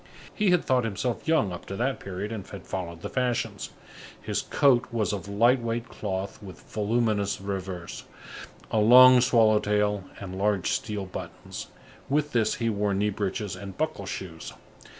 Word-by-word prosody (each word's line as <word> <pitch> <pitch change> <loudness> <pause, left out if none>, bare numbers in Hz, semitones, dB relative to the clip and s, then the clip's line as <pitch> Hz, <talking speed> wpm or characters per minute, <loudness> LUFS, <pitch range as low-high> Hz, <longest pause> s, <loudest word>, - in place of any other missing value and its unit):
He 210 -2 +1
had 180 -1 +3
thought 130 -1 +2
himself 115 +5 -3
young 160 - +3
up 90 - -9
to 100 - -5
that 130 +5 -1
period 100 +2 -5
and 105 -4 -6
had 100 - -9
followed 85 -3 -5
the - - -2
fashions. 125 -2 -1 0.5
His - - -2
coat 130 -4 +3
was 110 -2 0
of 100 -2 -5
light 120 +5 +3
weight 115 0 -3
cloth 95 0 -4
with 95 -3 -11
voluminous 105 -1 0
revers, 95 -3 -5 0.7
a 110 - +2
long 125 +3 +8
swallow 115 -4 +4
tail 105 -2 0
and 95 -1 -6
large 100 -3 +1
steel 105 -3 -2
buttons. 95 - -8 0.4
With 150 +1 +1
this 115 -4 +2
he 115 - -2
wore 105 -2 0
knee 105 +2 +1
breeches 100 -1 -3
and 95 +1 -9
buckle 145 -11 -2
shoes. 85 -4 -6
105 Hz, 165 wpm, -27 LUFS, 95-120 Hz, 0.7 s, long